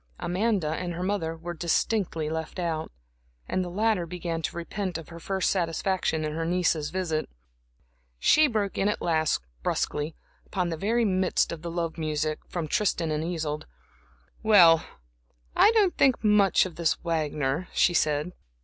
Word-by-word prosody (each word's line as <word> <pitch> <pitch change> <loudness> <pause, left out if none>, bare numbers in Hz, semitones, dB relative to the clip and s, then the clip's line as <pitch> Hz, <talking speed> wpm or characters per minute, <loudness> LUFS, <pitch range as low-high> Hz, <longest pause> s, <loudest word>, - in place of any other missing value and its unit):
Amanda 190 -2 0
and 175 +2 -3
her 175 - -3
mother 185 -4 -1
were 175 +1 -6
distinctly 170 0 0
left 160 +2 -4
out, 165 -3 -2 0.6
and 185 - 0
the 180 - -5
latter 205 -1 +1
began 170 -1 -4
to 165 - -4
repent 180 +1 -3
of 165 - -10
her 170 -1 -9
first 190 +2 0
satisfaction 170 -2 0
in 150 - -3
her 165 +1 -2
niece's 165 -3 +1
visit. 170 -4 -2 0.9
She 305 - +5
broke 210 -6 -1
in 195 - +2
at 210 - -1
last, 160 - +1 0.2
brusquely, 150 - -1 0.3
upon 180 -3 -2
the 165 - -2
very 225 +7 +1
midst 185 -2 +1
of 165 -2 -6
the 170 - -5
love 170 -1 -3
music 155 0 -1
from 170 -3 -4
"Tristan 170 -2 0
and 155 0 -1
Isolde." 160 -3 -3 0.7
"Well, 175 -7 +7 0.7
I - - +7
don't 410 -5 +3
think 265 -4 +3
much 210 -3 +4
of 175 -4 -8
this 170 -2 +2
Wagner," 155 -1 -1
she 175 - +3
said. 150 0 +1
170 Hz, 160 wpm, -27 LUFS, 160-190 Hz, 0.9 s, Well